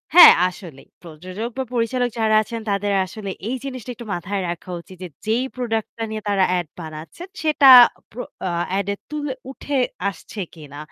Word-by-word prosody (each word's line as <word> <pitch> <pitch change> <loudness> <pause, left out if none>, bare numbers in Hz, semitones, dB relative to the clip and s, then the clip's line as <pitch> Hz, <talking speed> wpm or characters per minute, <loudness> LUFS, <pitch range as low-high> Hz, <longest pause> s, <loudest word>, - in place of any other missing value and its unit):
হ্যাঁ, 355 - +12 0.2
আসলেই। 170 -7 -10
প্রযোজক 185 +7 -7
বা 265 - 0
পরিচালক 245 +1 0
যারা 215 -1 +3
আছেন 230 +1 -6
তাদের 200 0 0
আসলে 200 +2 -7 0.2
এই 255 - -1
জিনিসটা 255 -3 -7
একটু 235 - -10
মাথায় 190 +3 -3
রাখা 175 +2 -6
উচিত 185 +1 -15
যে - - -5 0.2
যেই 230 +4 +1
প্রোডাক্ট 225 -3 -2
টা 225 - -3
নিয়ে 215 0 -4
তারা 195 -2 +3
এড 175 -3 -3
বানাচ্ছেন 160 - -9 0.2
সেটা 300 -3 +4 0.4
প্রো 245 +2 -6 0.2
আ - - -1 0.3
এড 200 - -3
এ - - -5
তুলে 295 -3 -3 0.2
উঠে 280 +1 -3 0.3
আসছে 200 +2 -10
কিনা। 145 -3 -12
215 Hz, 175 wpm, -21 LUFS, 180-245 Hz, 0.4 s, হ্যাঁ